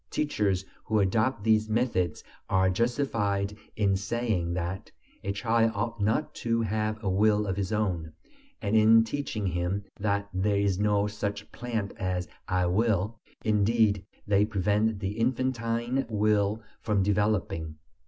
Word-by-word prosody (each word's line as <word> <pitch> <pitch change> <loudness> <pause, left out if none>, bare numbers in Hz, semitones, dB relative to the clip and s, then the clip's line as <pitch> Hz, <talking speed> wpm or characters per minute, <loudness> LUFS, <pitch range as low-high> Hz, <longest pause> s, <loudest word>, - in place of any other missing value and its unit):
Teachers 100 -10 0 0.2
who 110 -1 +1
adopt 110 +4 +1
these 110 0 +3
methods 110 -8 0 0.3
are 95 0 +3
justified 105 -3 0 0.2
in 100 -2 +2
saying 100 -4 -1
that 90 +2 -4 0.3
"a 100 - -1
child 115 +2 +2
ought 115 +2 -2
not 110 +9 +1
to 115 0 0
have 110 0 -1
a - - -2
will 105 +2 +3
of 95 -2 -1
his 100 0 -2
own," 90 -7 -1 0.5
and 105 +1 +1
in 110 +1 +7
teaching 115 -3 -3
him 90 +2 -1 0.2
that 100 -1 0
"there 100 +2 +1
is 100 -2 +1
no 105 -1 +2
such 105 0 -4
plant 115 -4 -3
as 90 -2 -2 0.2
'I 90 -1 +1
will.'" 105 +2 +1 0.3
Indeed, 105 -1 +3 0.2
they 105 -1 +3
prevent 105 +1 +1
the 100 +3 -3
infantine 120 0 0
will 105 0 +1 0.2
from 105 -3 +1
developing. 100 -6 0
105 Hz, 140 wpm, -28 LUFS, 100-115 Hz, 0.5 s, in